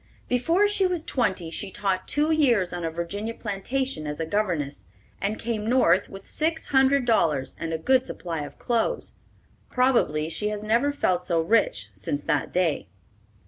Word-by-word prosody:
Before 330 +11 +3
she 405 -2 +2
was 355 -3 -2
twenty 190 - -1
she 195 +4 -3
taught 195 -1 -2
two 300 +2 +1
years 240 - +3
on 175 -1 -4
a 165 - 0
Virginia 200 +7 -4
plantation 215 - -3
as 150 +1 -4
a 160 - -1
governess, 160 - -2 0.3
and 210 +2 -1
came 220 -2 -2
North 255 +1 +3
with 195 -1 -10
six 320 +1 -1
hundred 270 -1 +4
dollars 155 - +1
and 165 0 -3
a 160 - 0
good 260 +9 +2
supply 170 -3 -5
of 145 - -7
clothes. 240 - -1 0.6
Probably 240 - +2
she 185 +6 -2
has 210 0 -4
never 235 +7 +2
felt 180 -10 0
so 170 -3 +2
rich 160 - +1
since 125 +9 -3
that - - 0
day. 165 - 0
210 Hz, 170 wpm, -25 LUFS, 165-260 Hz, 0.6 s, hundred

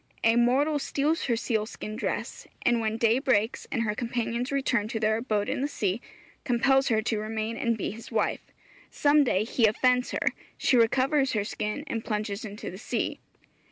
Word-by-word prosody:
A 225 0 +5
mortal 270 +6 +3
steals 295 +4 0
her 240 - +1
sealskin 215 -2 -3
dress, - - -4 0.2
and 240 -1 +3
when 220 0 -1
day 230 +2 +3
breaks, 240 -5 +1
and 230 -4 0
her 210 -2 0
companions 235 +2 -2
return 260 -6 +1
to 225 0 -3
their 220 0 +2
abode 215 -4 -1
in - - -1
the 280 - +1
sea, 205 -6 -2 0.4
compels 270 +2 +3
her 220 -2 +2
to 220 -1 0
remain 220 +1 -3
and 235 -3 0
be - - -2
his 225 +3 -10
wife. - - 0 0.5
Some 295 0 +4
day 210 -6 +1
he 225 0 +3
offends 250 +3 +2
her; - - +1 0.3
she - - +2
recovers 265 +4 +3
her 210 -2 +1
skin 210 +5 -3
and 225 -6 -3
plunges 210 -1 -3
into 210 -1 -6
the 185 - -9
sea. - - -2
230 Hz, 185 wpm, -27 LUFS, 215-260 Hz, 0.5 s, A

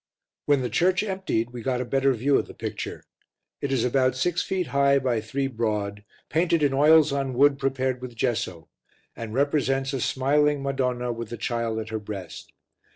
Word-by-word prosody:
When 145 -2 +4
the 125 - -2
church 185 +3 +2
emptied 190 - -2
we 120 -1 -7
got 125 +1 -1
a 125 - -2
better 135 +2 +2
view 135 +4 +1
of - - -4
the - - -12
picture. - - -5 0.6
It 140 - -2
is 130 -3 +1
about 130 0 +2
6 175 +6 0
ft. 185 -2 -1
high 140 -1 +3
by 125 -4 0
3 135 +6 -2
broad, 105 -5 -2 0.2
painted 165 0 +1
in 140 -2 +2
oils 155 +2 +5
on 135 -2 -2
wood 140 +1 +4
prepared 130 -2 -1
with 125 -2 -8
gesso, 105 - -2 0.5
and 115 -2 -6
represents 135 -1 +1
a 135 - -2
smiling 145 +3 +2
Madonna 125 -3 -1
with 115 -1 -6
the 120 - -6
Child 115 0 -2
at 110 0 -4
her 110 -1 -3
breast. 100 -4 -8
130 Hz, 185 wpm, -25 LUFS, 115-140 Hz, 0.6 s, oils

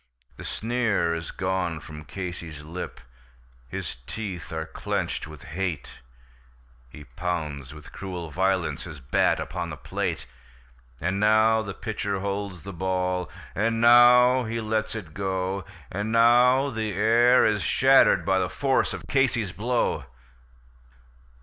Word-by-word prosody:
The - - -10
sneer 110 -7 0
is 80 -1 -5
gone 95 -3 -2
from 75 -1 -10
Casey's 85 -5 -7
lip, 85 -1 -7 0.7
his 60 - -6
teeth 100 -6 -6
are 80 -1 -3
clenched - - -3
with 75 -3 -12
hate; 85 -1 -4 0.9
He 75 +3 -11
pounds 75 0 -4
with 75 - -13
cruel 90 -4 -6
violence 95 0 0
his 80 -4 -9
bat 65 +1 +1
upon 85 0 -4
the 75 - -7
plate; 60 - -3 0.7
And 95 +3 -1
now 110 +1 +4
the 100 -3 -6
pitcher 100 -3 -3
holds 100 -2 -4
the 100 0 -7
ball, 90 0 -1 0.2
and 115 +2 0
now 125 +2 +7
he 115 +1 -3
lets 110 0 -2
it 90 -9 -7
go, 95 0 -2 0.3
And 105 +4 -3
now 125 +4 +5
the 110 -3 -3
air 115 +5 +5
is 105 -2 +2
shattered 135 +10 +4
by 95 0 +2
the 90 -1 -1
force 135 -2 +1
of - - -9
Casey's 120 -8 +1
blow. 120 +5 -1
95 Hz, 135 wpm, -26 LUFS, 85-110 Hz, 0.9 s, now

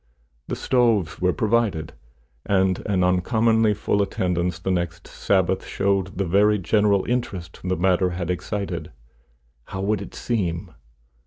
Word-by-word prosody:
The - - -2
stoves 115 -11 +1
were 90 0 +3
provided, 110 -7 0 0.5
and 95 -2 +1
an 95 -3 +1
uncommonly 110 +4 +2
full 100 0 0
attendance 90 -3 -1
the 95 +2 -2
next 85 -1 -2
Sabbath - - 0
showed 95 -1 -1
the 100 - 0
very 105 +4 +3
general 100 +1 +2
interest 95 -9 -3
the 95 0 -1
matter 90 +1 +2
had 90 0 -3
excited. 90 -2 -4 0.7
How 95 - -5
would 100 0 0
it 100 - -9
seem? 90 -6 -2
95 Hz, 135 wpm, -23 LUFS, 90-105 Hz, 0.7 s, were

